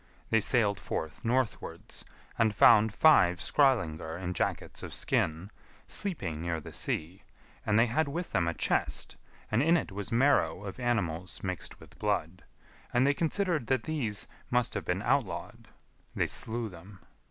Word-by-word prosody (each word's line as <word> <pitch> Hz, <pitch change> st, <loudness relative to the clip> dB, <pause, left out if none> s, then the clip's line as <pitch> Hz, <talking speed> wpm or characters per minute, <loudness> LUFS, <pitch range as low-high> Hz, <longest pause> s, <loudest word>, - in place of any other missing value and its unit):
They 110 Hz, -, +5 dB
sailed 105 Hz, -2 st, +2 dB
forth 80 Hz, 0 st, -5 dB
northwards, 125 Hz, 0 st, -2 dB, 0.3 s
and 110 Hz, -2 st, +2 dB
found 110 Hz, +2 st, +6 dB
five 105 Hz, -, +5 dB
Skrœlingar 85 Hz, -, +1 dB
in 90 Hz, -1 st, -3 dB
jackets -, -, -2 dB
of -, -, -6 dB
skin, 80 Hz, +6 st, 0 dB, 0.3 s
sleeping 95 Hz, -, -2 dB
[near 85 Hz, -1 st, -2 dB
the -, -, -10 dB
sea], 85 Hz, +5 st, -2 dB, 0.5 s
and 105 Hz, -, +3 dB
they 115 Hz, -, +6 dB
had 140 Hz, +6 st, 0 dB
with 170 Hz, +5 st, -4 dB
them 85 Hz, -, +1 dB
a 85 Hz, -, -1 dB
chest, -, -, 0 dB, 0.4 s
and 110 Hz, +3 st, +3 dB
in 165 Hz, +4 st, +4 dB
it 135 Hz, -, -4 dB
was 100 Hz, 0 st, -5 dB
marrow 115 Hz, -, +2 dB
of 100 Hz, +5 st, -7 dB
animals 95 Hz, -8 st, -2 dB
mixed 95 Hz, -3 st, -5 dB
with -, -, -16 dB
blood; 85 Hz, +4 st, -1 dB, 0.5 s
and 120 Hz, +2 st, +3 dB
they 140 Hz, -, +4 dB
considered 165 Hz, -, 0 dB
that 130 Hz, -4 st, +1 dB
these 120 Hz, -10 st, -2 dB, 0.2 s
must 125 Hz, -1 st, +1 dB
have -, -, -4 dB
been 95 Hz, +3 st, -1 dB
outlawed. 115 Hz, -10 st, -1 dB, 0.5 s
They -, -, +2 dB
slew 115 Hz, +1 st, -2 dB
them. 90 Hz, +1 st, -13 dB
105 Hz, 155 wpm, -30 LUFS, 90-130 Hz, 0.5 s, found